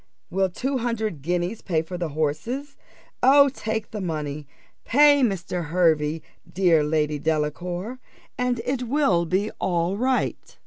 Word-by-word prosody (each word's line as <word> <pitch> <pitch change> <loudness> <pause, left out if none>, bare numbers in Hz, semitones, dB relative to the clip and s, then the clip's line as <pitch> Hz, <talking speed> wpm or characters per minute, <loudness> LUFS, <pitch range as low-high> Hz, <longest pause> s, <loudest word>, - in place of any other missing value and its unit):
Will 190 +1 +1
two 260 +8 -2
hundred 220 - -2
guineas 175 +6 -2
pay 160 -4 0
for 180 +3 -7
the 175 -2 -3
horses? 160 - -3 0.5
Oh, 280 +2 +7
take 220 -4 -4
the 210 - -4
money 150 -4 -4 0.4
pay 290 +2 +5
Mr. 185 -6 -1
Hervey, 160 -2 +1 0.3
dear 170 -4 +3
Lady 150 -1 0
Delacour, 175 - -2 0.4
and 250 -1 -1
it 260 0 -1
will 270 - +2
all 170 - -1
be 195 +5 0 0.5
right." 260 0 -1
180 Hz, 135 wpm, -24 LUFS, 160-245 Hz, 0.5 s, Oh